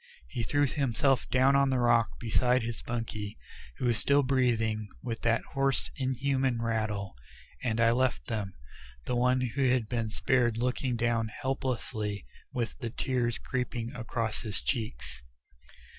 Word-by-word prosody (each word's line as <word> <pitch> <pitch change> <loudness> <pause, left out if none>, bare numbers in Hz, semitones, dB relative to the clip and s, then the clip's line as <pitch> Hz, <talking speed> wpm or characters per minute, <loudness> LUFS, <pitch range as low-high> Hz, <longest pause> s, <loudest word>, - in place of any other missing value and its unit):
He 120 - -3
threw 145 +6 +2
himself 135 0 +1
down 130 +2 +4
on 140 0 +4
the 130 - +2
rock 120 -2 +3
beside 125 +2 +2
his 115 0 -4
bunkie, 110 -3 -4 0.4
who - - -2
was 120 -2 +2
still 140 0 +4
breathing 115 -5 +1 0.2
with 115 -2 -4
that 115 0 +2
hoarse 135 -1 +1
inhuman 130 -1 0
rattle, 110 -4 -1 0.5
and 115 -2 0
I 115 0 +5
left 130 +1 +1
them, 105 -5 -3 0.5
the 125 - -1
one 125 +1 +3
who 130 +2 +1
had 125 -3 +2
been 115 -1 -1
spared 115 +5 +2
looking 125 +1 0
down 115 -1 +1
helplessly 110 - -3 0.3
with 120 -4 -2
the 120 - -3
tears 120 0 0
creeping 125 -2 -3
across 115 -2 -2
his 110 -4 -2
cheeks. 110 - -3
120 Hz, 145 wpm, -30 LUFS, 115-130 Hz, 0.5 s, I